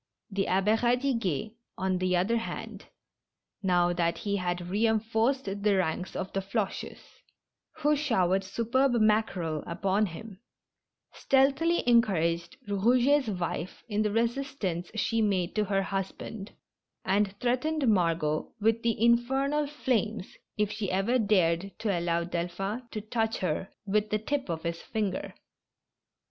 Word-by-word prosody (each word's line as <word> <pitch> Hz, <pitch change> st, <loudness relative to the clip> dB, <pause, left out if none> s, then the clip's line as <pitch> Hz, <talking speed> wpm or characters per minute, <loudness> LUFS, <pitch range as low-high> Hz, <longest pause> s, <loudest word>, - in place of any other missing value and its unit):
The 195 Hz, 0 st, 0 dB
Abbe 195 Hz, +4 st, +3 dB
Radiguet, 235 Hz, -, 0 dB, 0.3 s
on 185 Hz, 0 st, 0 dB
the 185 Hz, 0 st, +2 dB
other 205 Hz, +7 st, +2 dB
hand, 225 Hz, -, -6 dB, 0.8 s
now 175 Hz, -2 st, +2 dB
that 170 Hz, -1 st, 0 dB
he 200 Hz, -1 st, -1 dB
had 175 Hz, -1 st, -2 dB
reinforced 225 Hz, +5 st, +1 dB
the 200 Hz, +1 st, +1 dB
ranks 180 Hz, 0 st, -1 dB
of 190 Hz, -, -4 dB
the 195 Hz, -, 0 dB
Floches 195 Hz, +1 st, -3 dB, 0.8 s
(who 300 Hz, -1 st, +2 dB
showered 195 Hz, -10 st, +1 dB
superb 235 Hz, +7 st, +1 dB
mackerel 210 Hz, -8 st, +1 dB
upon 195 Hz, +4 st, +1 dB
him), 190 Hz, +3 st, -9 dB, 0.7 s
stealthily 275 Hz, +6 st, +2 dB
encouraged 175 Hz, -7 st, +2 dB
Eouget's 245 Hz, +7 st, +3 dB
wife 170 Hz, 0 st, -4 dB
in 210 Hz, -2 st, 0 dB
the 215 Hz, -, +1 dB
resistance 230 Hz, -6 st, -1 dB
she 225 Hz, +1 st, +1 dB
made 195 Hz, -4 st, +1 dB
to 215 Hz, -1 st, +1 dB
her 195 Hz, -1 st, +1 dB
husband, 195 Hz, +2 st, -5 dB, 0.5 s
and 200 Hz, +1 st, +1 dB
threatened 260 Hz, +4 st, 0 dB
Margot 165 Hz, -6 st, +1 dB
with 225 Hz, +2 st, +2 dB
the 230 Hz, -2 st, 0 dB
infernal 265 Hz, +6 st, +2 dB
flames 225 Hz, -8 st, -2 dB, 0.2 s
if 210 Hz, -1 st, +1 dB
she 210 Hz, -2 st, -3 dB
ever 200 Hz, +7 st, +1 dB
dared 195 Hz, -3 st, +1 dB
to 205 Hz, -4 st, 0 dB
allow 170 Hz, 0 st, 0 dB
Delphin 180 Hz, +7 st, -3 dB
to 215 Hz, -, -5 dB
touch 225 Hz, +1 st, -1 dB
her 180 Hz, +2 st, -2 dB, 0.2 s
with 210 Hz, +1 st, +1 dB
the 215 Hz, -, +1 dB
tip 270 Hz, +3 st, -3 dB
of 160 Hz, -1 st, -3 dB
his 170 Hz, 0 st, -3 dB
finger. 210 Hz, -4 st, -3 dB
210 Hz, 130 wpm, -29 LUFS, 185-235 Hz, 0.8 s, Abbe